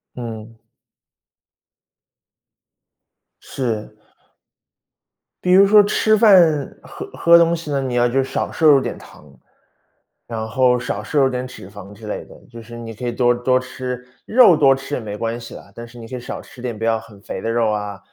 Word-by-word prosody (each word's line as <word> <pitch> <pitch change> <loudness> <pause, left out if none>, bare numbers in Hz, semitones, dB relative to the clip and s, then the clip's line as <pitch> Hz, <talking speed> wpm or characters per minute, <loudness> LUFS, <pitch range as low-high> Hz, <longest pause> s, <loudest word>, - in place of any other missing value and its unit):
嗯。 115 -2 -8 2.9
是。 110 -5 -4 1.5
比 180 - +1
如 195 +2 +7
说 210 0 +7
吃 215 +1 +2
饭、 175 - +4
喝 - - -9
喝 170 0 +6
东 170 0 +3
西 165 -2 -5
呢， 140 -1 -1
你 130 -2 -3
要 120 0 +3
就 135 +2 0
少 - - -3
摄 160 - -2
入 145 -3 +7
点 - - -5
糖， 75 - -16 1.0
然 110 -1 -5
后 125 +2 +2
少 105 -4 -4
摄 145 +7 -1
入 135 - +4
点 125 0 -4
脂 100 -6 -11
肪 100 0 -12
之 105 +1 -12
类 - - -5
的， - - -16 0.2
就 115 0 -11
是 120 +1 -11
你 115 -1 -8
可 115 +3 -8
以 120 - -1
多 120 0 +2
多 130 +1 +1
吃 125 -1 -7 0.2
肉 235 -7 +6
多 135 -3 +5
吃 135 +2 -5
也 - - -4
没 105 -2 -7
关 115 +1 -3
系 115 -1 -10
啦， - - -12
但 115 - -8
是 120 0 -14
你 115 - -10
可 130 - -7
以 125 - -5
少 - - -7
吃 125 - -15
点， 120 -4 -5
不 115 - -3
要 115 -1 +2
很 110 -3 -14
肥 - - -7
的 115 - -2
肉 115 -1 +1
啊， 105 -2 -4
120 Hz, 205 characters per minute, -19 LUFS, 115-135 Hz, 2.9 s, 如